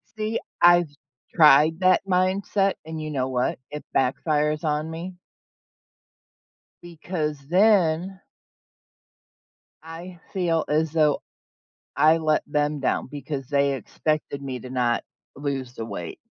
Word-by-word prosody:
See, 215 Hz, +1 st, -2 dB, 0.2 s
I've 175 Hz, -2 st, +6 dB, 0.4 s
tried 155 Hz, +1 st, +6 dB
that 185 Hz, +1 st, +3 dB
mindset, 190 Hz, +2 st, +1 dB
and 160 Hz, -1 st, -6 dB
you 155 Hz, -, -5 dB
know 130 Hz, -3 st, -2 dB
what, 125 Hz, -1 st, -1 dB
it 150 Hz, -, -6 dB
backfires 150 Hz, +3 st, +1 dB
on 150 Hz, +1 st, -1 dB
me 175 Hz, +3 st, -7 dB, 1.7 s
because 160 Hz, -3 st, -4 dB
then 185 Hz, -1 st, +3 dB, 1.6 s
I 165 Hz, +2 st, -10 dB
feel 170 Hz, -4 st, 0 dB
as 155 Hz, +1 st, +1 dB
though, 155 Hz, -3 st, +2 dB, 0.7 s
I 160 Hz, +2 st, +5 dB
let 155 Hz, -1 st, +1 dB
them 150 Hz, 0 st, 0 dB
down 135 Hz, -, -1 dB
because 140 Hz, -2 st, -5 dB
they 140 Hz, -1 st, +2 dB
expected 140 Hz, +3 st, -3 dB
me 130 Hz, -2 st, -5 dB
to 125 Hz, -, -10 dB
not 120 Hz, -2 st, 0 dB, 0.3 s
lose 135 Hz, -3 st, -4 dB
the 115 Hz, -, -5 dB
weight 90 Hz, -6 st, -6 dB
155 Hz, 120 wpm, -24 LUFS, 140-175 Hz, 1.7 s, I've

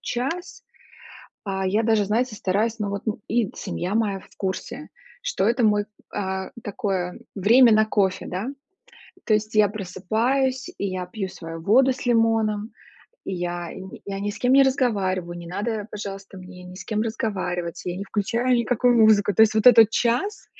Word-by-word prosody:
час, 350 Hz, -, -4 dB, 0.8 s
а, 190 Hz, -2 st, -2 dB
я 210 Hz, +4 st, +1 dB
даже, 220 Hz, -2 st, +2 dB
знаете, 230 Hz, +2 st, 0 dB
стараюсь, 215 Hz, +4 st, 0 dB
но 205 Hz, -1 st, -2 dB
вот, 200 Hz, +1 st, -5 dB
м, 220 Hz, 0 st, -3 dB
и 230 Hz, -3 st, +1 dB
семья 185 Hz, +3 st, -4 dB
моя 205 Hz, -4 st, 0 dB
в -, -, -18 dB
курсе, 190 Hz, -1 st, -4 dB, 0.3 s
что 190 Hz, -, -1 dB
это 240 Hz, +1 st, +1 dB
мой, 210 Hz, -1 st, +3 dB, 0.3 s
а, 190 Hz, -1 st, -3 dB
такое 195 Hz, -4 st, -3 dB, 0.2 s
время 230 Hz, +5 st, +6 dB
на 215 Hz, 0 st, +4 dB
кофе, 195 Hz, -3 st, 0 dB
да. 185 Hz, +6 st, -4 dB, 0.8 s
То 215 Hz, -, +2 dB
есть 215 Hz, +1 st, -3 dB
я 210 Hz, -1 st, +6 dB
просыпаюсь, 225 Hz, +7 st, -1 dB
и 200 Hz, -, -2 dB
я 185 Hz, -1 st, -4 dB
пью 195 Hz, 0 st, -4 dB
свою 165 Hz, -2 st, -8 dB
воду 255 Hz, +9 st, +4 dB
с 255 Hz, -, -9 dB
лимоном, 225 Hz, -2 st, +1 dB, 0.5 s
и 190 Hz, -, -4 dB
я 175 Hz, -1 st, -4 dB
не 190 Hz, 0 st, -10 dB
я 195 Hz, 0 st, -4 dB
ни 205 Hz, -, -2 dB
с -, -, -9 dB
кем 250 Hz, +1 st, +2 dB
не 275 Hz, 0 st, +7 dB
разговариваю, 195 Hz, -10 st, 0 dB
не 170 Hz, -, -9 dB
надо, 210 Hz, +3 st, -3 dB
пожалуйста, 195 Hz, -1 st, -7 dB
мне 180 Hz, 0 st, -12 dB
ни 180 Hz, 0 st, -11 dB
с 185 Hz, -1 st, -9 dB
кем 215 Hz, 0 st, -2 dB
разговаривать, 185 Hz, -6 st, -3 dB
я 180 Hz, 0 st, -3 dB
не 200 Hz, -, -5 dB
включаю 230 Hz, +5 st, 0 dB
никакую 245 Hz, +1 st, +2 dB
музыку. 215 Hz, -2 st, +5 dB
То -, -, +2 dB
есть, 220 Hz, 0 st, +4 dB
вот 220 Hz, +2 st, +1 dB
этот 225 Hz, -3 st, +9 dB
час, 245 Hz, -, 0 dB
210 Hz, 180 wpm, -23 LUFS, 190-230 Hz, 0.8 s, этот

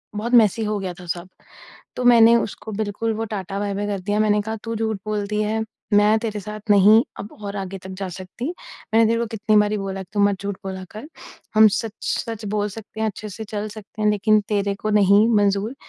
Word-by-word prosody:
बहुत 235 Hz, +4 st, -3 dB
मेसी 225 Hz, -1 st, +5 dB
हो 210 Hz, 0 st, -1 dB
गया 185 Hz, -2 st, -4 dB
था 180 Hz, -, -10 dB
सब। 175 Hz, +2 st, -4 dB, 0.7 s
तो 250 Hz, -, -2 dB
मैंने 235 Hz, -1 st, +7 dB
उसको 220 Hz, -1 st, -4 dB
बिल्कुल 215 Hz, +2 st, -2 dB
वो 225 Hz, +1 st, -2 dB
टाटा 195 Hz, -1 st, -4 dB
बाय 200 Hz, -1 st, -2 dB
बाय 205 Hz, +1 st, -2 dB
कर 200 Hz, -1 st, -2 dB
दिया। 205 Hz, +3 st, -1 dB
मैंने 210 Hz, -1 st, +3 dB
कहा, 220 Hz, +1 st, -4 dB
"तू 230 Hz, 0 st, -4 dB
झूठ 220 Hz, -2 st, -1 dB
बोलती 210 Hz, 0 st, -2 dB
है, 220 Hz, +1 st, -1 dB, 0.3 s
मैं 210 Hz, +2 st, +5 dB
तेरे 215 Hz, -2 st, -4 dB
साथ 210 Hz, +2 st, -7 dB
नहीं 205 Hz, +3 st, +7 dB, 0.2 s
अब 205 Hz, -, -8 dB
और 200 Hz, 0 st, -5 dB
आगे 195 Hz, 0 st, -5 dB
तक 190 Hz, +1 st, -10 dB
जा 190 Hz, -, -3 dB
सकती, 185 Hz, -, -7 dB, 0.5 s
मैंने 225 Hz, 0 st, +6 dB
तेरे 230 Hz, +1 st, +1 dB
को 235 Hz, -, -1 dB
कितनी 215 Hz, 0 st, +1 dB
बार 210 Hz, 0 st, +4 dB
ही 210 Hz, -, 0 dB
बोला 195 Hz, -1 st, -4 dB
कि 180 Hz, -, -16 dB
तू 205 Hz, -, +1 dB
मत 200 Hz, -1 st, +2 dB
झूठ 200 Hz, -1 st, -3 dB
बोला 190 Hz, -1 st, -5 dB
कर, 220 Hz, +8 st, -9 dB, 0.5 s
हम 220 Hz, 0 st, +8 dB
सच 225 Hz, -2 st, -4 dB
सच 225 Hz, -2 st, -3 dB
बोल 210 Hz, 0 st, 0 dB
सकते 220 Hz, +1 st, -10 dB
हैं, 220 Hz, -, +1 dB
अच्छे 215 Hz, +1 st, -7 dB
से 220 Hz, +3 st, -7 dB
चल 210 Hz, 0 st, -4 dB
सकते 215 Hz, 0 st, -9 dB
हैं, 210 Hz, -, +3 dB
लेकिन 210 Hz, +1 st, +3 dB
तेरे 200 Hz, -1 st, 0 dB
को 215 Hz, -, 0 dB
नहीं 205 Hz, +1 st, +5 dB
मंज़ूर।" 205 Hz, +4 st, +1 dB
210 Hz, 230 wpm, -22 LUFS, 200-220 Hz, 0.7 s, हम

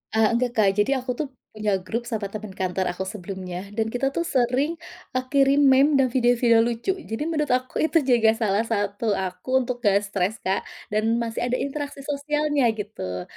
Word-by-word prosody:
Eee, 220 Hz, -1 st, +5 dB
enggak, 245 Hz, 0 st, +1 dB
Kak, 205 Hz, -2 st, +5 dB
jadi 255 Hz, +6 st, +2 dB
aku 255 Hz, 0 st, -3 dB
tuh 295 Hz, +2 st, -3 dB, 0.2 s
punya 210 Hz, -2 st, 0 dB
grup 230 Hz, +5 st, -3 dB
sama 215 Hz, -4 st, -2 dB
temen 215 Hz, -2 st, -6 dB
kantor 185 Hz, 0 st, -1 dB
aku 185 Hz, +2 st, -4 dB
sebelumnya 190 Hz, -1 st, -6 dB
dan 225 Hz, 0 st, 0 dB
kita 245 Hz, +2 st, 0 dB
tuh 340 Hz, -, +1 dB
sering, 260 Hz, +2 st, +1 dB, 0.4 s
eee, 255 Hz, -, +1 dB
kirim 275 Hz, 0 st, +4 dB
meme 280 Hz, +3 st, +5 dB
dan 265 Hz, -, +4 dB
video-video 240 Hz, -2 st, +4 dB
lucu, 240 Hz, +11 st, -1 dB
jadi 225 Hz, +7 st, -2 dB
menurut 300 Hz, -2 st, 0 dB
aku 255 Hz, 0 st, 0 dB
itu 320 Hz, +1 st, +3 dB
juga 235 Hz, -4 st, +4 dB
salah 215 Hz, -1 st, +1 dB
satu 205 Hz, 0 st, -1 dB
aku 185 Hz, +4 st, -5 dB
untuk 250 Hz, +1 st, -3 dB
nggak 200 Hz, -1 st, +4 dB
stres, 200 Hz, +1 st, -1 dB
Kak. 190 Hz, +1 st, 0 dB, 0.3 s
Dan 220 Hz, +2 st, +1 dB
masih 230 Hz, +1 st, -2 dB
ada 250 Hz, -, 0 dB
interaksi 280 Hz, 0 st, -4 dB
sosialnya, 295 Hz, -1 st, 0 dB
gitu. 95 Hz, -, -5 dB
230 Hz, 185 wpm, -24 LUFS, 205-270 Hz, 0.4 s, Eee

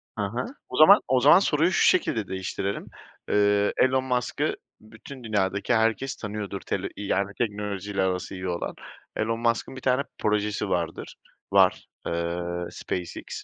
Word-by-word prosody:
Ha 100 Hz, 0 st, -3 dB
ha. 120 Hz, -, -2 dB, 0.2 s
O 125 Hz, -, -5 dB
zaman 195 Hz, +7 st, +9 dB
o 130 Hz, 0 st, +3 dB
zaman 145 Hz, +7 st, +7 dB
soruyu 165 Hz, -1 st, +2 dB
şu -, -, +2 dB
şekilde 120 Hz, -, +2 dB
değiştirelim. 95 Hz, +1 st, -4 dB, 0.4 s
Iıı, 105 Hz, 0 st, +3 dB
Elon 130 Hz, 0 st, +3 dB
Musk'ı 125 Hz, -2 st, -1 dB, 0.3 s
bütün 120 Hz, +4 st, -12 dB
dünyadaki 100 Hz, 0 st, 0 dB
herkes 115 Hz, +4 st, +1 dB
tanıyordur 105 Hz, -2 st, -5 dB
tele 100 Hz, 0 st, -3 dB
iii, 100 Hz, -1 st, -6 dB
yani, 100 Hz, +1 st, 0 dB
teknolojiyle 105 Hz, -3 st, -2 dB
arası 95 Hz, 0 st, -2 dB
iyi 95 Hz, 0 st, -5 dB
olan. 85 Hz, -, -3 dB, 0.4 s
Elon 115 Hz, +1 st, -1 dB
Musk'ın 115 Hz, +2 st, 0 dB
1 130 Hz, -, -8 dB
tane 130 Hz, +1 st, +2 dB, 0.2 s
projesi 105 Hz, -1 st, 0 dB
vardır -, -, -3 dB, 0.4 s
var, -, -, +4 dB, 0.2 s
ııı, 85 Hz, +1 st, -2 dB
SpaceX. 90 Hz, -2 st, -5 dB
105 Hz, 145 wpm, -26 LUFS, 95-125 Hz, 0.4 s, zaman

